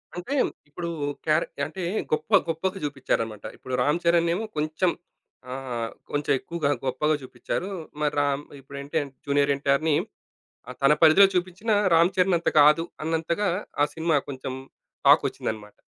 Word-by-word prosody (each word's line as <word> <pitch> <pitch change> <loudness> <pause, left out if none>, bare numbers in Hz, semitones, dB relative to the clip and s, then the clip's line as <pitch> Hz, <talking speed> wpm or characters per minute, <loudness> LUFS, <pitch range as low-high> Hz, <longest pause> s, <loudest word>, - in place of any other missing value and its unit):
అంటే 180 +11 -5 0.4
ఇప్పుడు, 170 +3 -5 0.4
క్యారె - - +2 0.2
అంటే 190 - -7 0.3
గొప్ప 155 - -1 0.2
గొప్పగా 185 +4 -2
చూపిచ్చారన్నమాట. 115 -6 -2
ఇప్పుడు 130 - -8
'రామ్ 150 +6 +2
చరణ్' 170 0 +3
నేమో 210 +6 -1
కొంచెం 155 +4 +1 0.6
ఆహ్, 125 -3 -4 0.2
కొంచెం 145 0 -1
ఎక్కువగా, 170 -4 -2 0.2
గొప్పగా 150 +4 +1
చూపిచ్చారు. 180 +8 -4 0.3
మరి 150 - +1
రామ్ 140 0 0 0.2
ఇప్పుడె 140 +1 -9 0.4
జూనియర్ 140 0 +2
ఎన్‌టీఆర్‌ని 140 +2 +1 0.7
ఆహ్, 125 - -8
తన 140 +2 +6
పరిధిలో 165 +5 +8
చూపించినా 185 +5 0 0.2
రామ్ 170 +3 +5
చరణ్ 180 -1 +3
అంత 170 - -2
కాదు 150 +3 +6 0.2
అన్నంతగా, 165 +5 0 0.3
ఆ - - +4
సినిమా 160 -1 +1
కొంచెం 130 -1 -5 0.5
టాకొచ్చిందన్నమాట. 105 -1 +2
155 Hz, 130 wpm, -25 LUFS, 140-170 Hz, 0.7 s, పరిధిలో